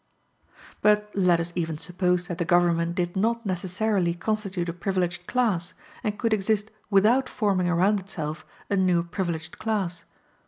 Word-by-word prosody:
But 210 Hz, 0 st, +3 dB
let 180 Hz, -3 st, +3 dB
us 170 Hz, +1 st, -3 dB
even 165 Hz, -3 st, -2 dB
suppose 180 Hz, +2 st, 0 dB
that 175 Hz, 0 st, -5 dB
the -, -, +2 dB
government 170 Hz, 0 st, +2 dB
did 175 Hz, -2 st, -1 dB
not 230 Hz, +4 st, 0 dB
necessarily 185 Hz, -1 st, 0 dB
constitute 195 Hz, -2 st, -2 dB
a 170 Hz, -, -2 dB
privileged 180 Hz, -1 st, -2 dB
class, 185 Hz, -8 st, 0 dB, 0.3 s
and 210 Hz, -3 st, -1 dB
could 230 Hz, 0 st, +1 dB
exist 210 Hz, +1 st, 0 dB, 0.2 s
without 220 Hz, +6 st, +4 dB
forming 190 Hz, -4 st, +1 dB
around 190 Hz, +4 st, +3 dB
itself 155 Hz, -5 st, -5 dB, 0.3 s
a -, -, +3 dB
new 180 Hz, -3 st, +3 dB
privileged 170 Hz, -2 st, -4 dB
class. 190 Hz, -6 st, -2 dB
185 Hz, 150 wpm, -26 LUFS, 175-210 Hz, 0.3 s, without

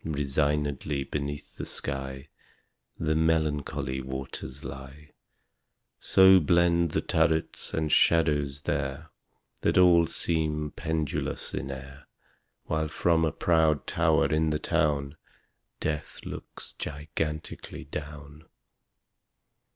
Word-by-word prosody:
Resignedly 75 Hz, -1 st, -1 dB
beneath 70 Hz, +1 st, -5 dB
the -, -, -4 dB
sky 65 Hz, +2 st, -4 dB, 0.7 s
The 80 Hz, -1 st, 0 dB
melancholy 75 Hz, -4 st, 0 dB
waters 65 Hz, 0 st, -6 dB
lie. 70 Hz, +3 st, -9 dB, 0.9 s
So 95 Hz, 0 st, +7 dB
blend 85 Hz, +1 st, +3 dB
the -, -, 0 dB
turrets 80 Hz, 0 st, 0 dB
and 80 Hz, -1 st, -1 dB
shadows 75 Hz, -4 st, +3 dB
there 70 Hz, +4 st, -3 dB, 0.5 s
That -, -, +2 dB
all 85 Hz, -2 st, +6 dB
seem 75 Hz, -3 st, -1 dB
pendulous 80 Hz, -3 st, -2 dB
in 65 Hz, -, -3 dB
air, 65 Hz, +1 st, -9 dB, 0.6 s
While 80 Hz, 0 st, -1 dB
from 80 Hz, +2 st, +2 dB
a 80 Hz, -, +2 dB
proud 80 Hz, -3 st, +2 dB
tower 80 Hz, -1 st, +2 dB
in 80 Hz, 0 st, +1 dB
the 75 Hz, -, +1 dB
town 70 Hz, -1 st, 0 dB, 0.6 s
Death 75 Hz, -1 st, -3 dB
looks -, -, -8 dB
gigantically 75 Hz, +1 st, -5 dB
down. 75 Hz, 0 st, -8 dB
75 Hz, 100 wpm, -28 LUFS, 70-80 Hz, 0.9 s, So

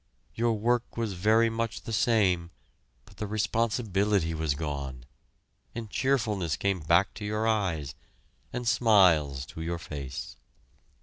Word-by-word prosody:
Your 115 Hz, 0 st, +1 dB
work 120 Hz, +3 st, 0 dB
was 115 Hz, -4 st, -1 dB
very 110 Hz, +5 st, +3 dB
much 115 Hz, -1 st, -3 dB
the 115 Hz, -, -5 dB
same, 95 Hz, -7 st, +2 dB, 0.6 s
but 100 Hz, -, -19 dB
the 105 Hz, -, -4 dB
responsibility 105 Hz, -4 st, 0 dB
was 80 Hz, -2 st, -1 dB
gone, 70 Hz, -5 st, -5 dB, 0.7 s
and 115 Hz, -3 st, -6 dB
cheerfulness 110 Hz, -, 0 dB
came 100 Hz, -2 st, 0 dB
back 85 Hz, +5 st, +3 dB
to 105 Hz, -, -8 dB
your 105 Hz, +1 st, -1 dB
eyes, 90 Hz, -10 st, 0 dB, 0.6 s
and 120 Hz, -1 st, -4 dB
smiles 90 Hz, -, +4 dB
to 80 Hz, -, -9 dB
your 85 Hz, +1 st, -2 dB
face. 70 Hz, -6 st, -7 dB
100 Hz, 130 wpm, -28 LUFS, 80-115 Hz, 0.7 s, smiles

